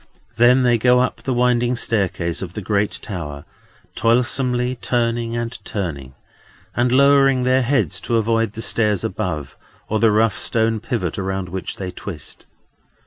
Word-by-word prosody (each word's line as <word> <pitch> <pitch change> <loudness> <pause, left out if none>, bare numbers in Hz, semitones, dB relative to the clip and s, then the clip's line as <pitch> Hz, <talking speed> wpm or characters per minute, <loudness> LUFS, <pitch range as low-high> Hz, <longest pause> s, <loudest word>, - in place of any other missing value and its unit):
Then 125 +3 +5
they 120 -2 +3
go 125 +2 +4
up 125 - -1
the 135 - -3
winding 125 0 +2
staircase 95 -7 -1
of 90 -2 -6
the 105 - -4
great 105 +1 0
tower, 75 -8 -6 0.5
toilsomely, 125 +1 +1
turning 115 -1 -1
and 120 0 -3
turning, 70 -10 -5 0.6
and 120 0 +1
lowering 135 -1 +4
their 130 +1 +3
heads 130 +2 0
to 115 - 0
avoid 115 -1 +1
the 115 0 -6
stairs 105 -4 +1
above, 75 -4 -4 0.3
or 110 - 0
the 115 - +4
rough 110 -1 +2
stone 115 -1 +1
pivot 115 -1 -3
around 95 -1 -3
which 95 +1 -5
they 95 -2 -5
twist. 85 -8 -8
115 Hz, 150 wpm, -20 LUFS, 100-125 Hz, 0.6 s, Then